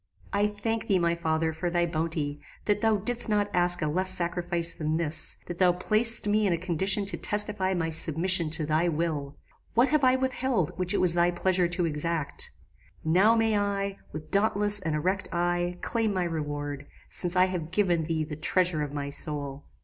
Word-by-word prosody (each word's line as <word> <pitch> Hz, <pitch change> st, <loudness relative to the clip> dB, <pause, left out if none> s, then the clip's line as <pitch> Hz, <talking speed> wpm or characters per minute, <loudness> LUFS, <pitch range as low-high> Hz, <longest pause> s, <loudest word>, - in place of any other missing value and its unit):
"I 205 Hz, +1 st, +2 dB
thank 220 Hz, +2 st, -4 dB
thee, 195 Hz, -, +2 dB
my 170 Hz, -1 st, +1 dB
father, 160 Hz, -1 st, -1 dB
for 175 Hz, +3 st, -3 dB
thy 175 Hz, 0 st, 0 dB
bounty; 155 Hz, -3 st, -3 dB, 0.3 s
that 205 Hz, -1 st, 0 dB
thou 220 Hz, -1 st, +2 dB
didst 235 Hz, +3 st, +3 dB
not 205 Hz, -1 st, 0 dB
ask 175 Hz, -1 st, +1 dB
a -, -, 0 dB
less 185 Hz, +5 st, 0 dB
sacrifice 170 Hz, -1 st, 0 dB
than 155 Hz, 0 st, -2 dB
this; 160 Hz, -1 st, 0 dB
that 175 Hz, -1 st, -8 dB
thou 180 Hz, -2 st, +4 dB
placedst 220 Hz, +6 st, +3 dB
me 210 Hz, 0 st, +2 dB
in 180 Hz, -, +1 dB
a -, -, 0 dB
condition 185 Hz, +4 st, +1 dB
to 190 Hz, -4 st, -1 dB
testify 205 Hz, -2 st, +1 dB
my 165 Hz, -2 st, -2 dB
submission 165 Hz, +2 st, +3 dB
to 155 Hz, 0 st, +1 dB
thy 155 Hz, +3 st, +1 dB
will! 150 Hz, -3 st, -3 dB, 0.4 s
What 240 Hz, +4 st, +4 dB
have 305 Hz, -2 st, +1 dB
I 255 Hz, 0 st, +4 dB
withheld 260 Hz, -, -1 dB
which 185 Hz, +2 st, -1 dB
it -, -, +1 dB
was 180 Hz, -2 st, +4 dB
thy 175 Hz, 0 st, +2 dB
pleasure 180 Hz, 0 st, +1 dB
to 175 Hz, 0 st, -2 dB
exact? 160 Hz, -1 st, -3 dB, 0.5 s
Now 190 Hz, +8 st, +3 dB
may 225 Hz, -1 st, +1 dB
I, 200 Hz, -1 st, -2 dB
with 155 Hz, 0 st, -9 dB
dauntless 205 Hz, 0 st, +2 dB
and 160 Hz, -5 st, -3 dB
erect 185 Hz, +6 st, -2 dB
eye, 175 Hz, 0 st, -1 dB
claim 225 Hz, -2 st, -1 dB
my 185 Hz, -, 0 dB
reward, 145 Hz, -3 st, -5 dB, 0.2 s
since 180 Hz, 0 st, +3 dB
I 180 Hz, 0 st, +5 dB
have 180 Hz, -4 st, -4 dB
given 175 Hz, -4 st, 0 dB
thee 160 Hz, -1 st, -2 dB
the 155 Hz, 0 st, -7 dB
treasure 170 Hz, +1 st, 0 dB
of 145 Hz, -1 st, -4 dB
my 140 Hz, -1 st, -4 dB
soul. 145 Hz, -2 st, -1 dB
175 Hz, 195 wpm, -27 LUFS, 160-200 Hz, 0.5 s, I